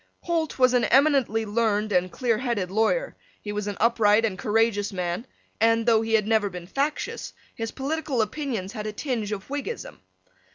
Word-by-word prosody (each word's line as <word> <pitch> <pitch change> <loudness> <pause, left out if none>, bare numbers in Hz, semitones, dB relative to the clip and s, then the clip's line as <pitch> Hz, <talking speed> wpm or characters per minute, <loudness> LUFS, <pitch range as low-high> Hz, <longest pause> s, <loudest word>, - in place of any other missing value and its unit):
Holt 330 -3 -1
was 255 -1 +4
an 245 -2 +3
eminently 270 -6 +3
learned 215 -1 0
and 180 -1 +1
clear 235 -4 0
headed 230 -8 -2
lawyer: 360 - +1 0.2
he 205 - -6
was 210 0 -3
an 205 - -4
upright 225 -1 +4
and 210 -4 -1
courageous 210 0 +1
man; 180 +5 -3 0.3
and, 225 +1 +3
though 225 -2 +4
he 225 0 +1
had 215 -2 +2
never 215 -2 +2
been 180 -2 -8
factious, 280 +10 -3 0.2
his 225 0 -4
political 275 -3 -1
opinions 220 -6 -4
had 215 -2 -5
a 215 - -4
tinge 225 -4 -3
of 195 -2 -5
Whiggism. 415 - -5
225 Hz, 175 wpm, -25 LUFS, 205-260 Hz, 0.3 s, was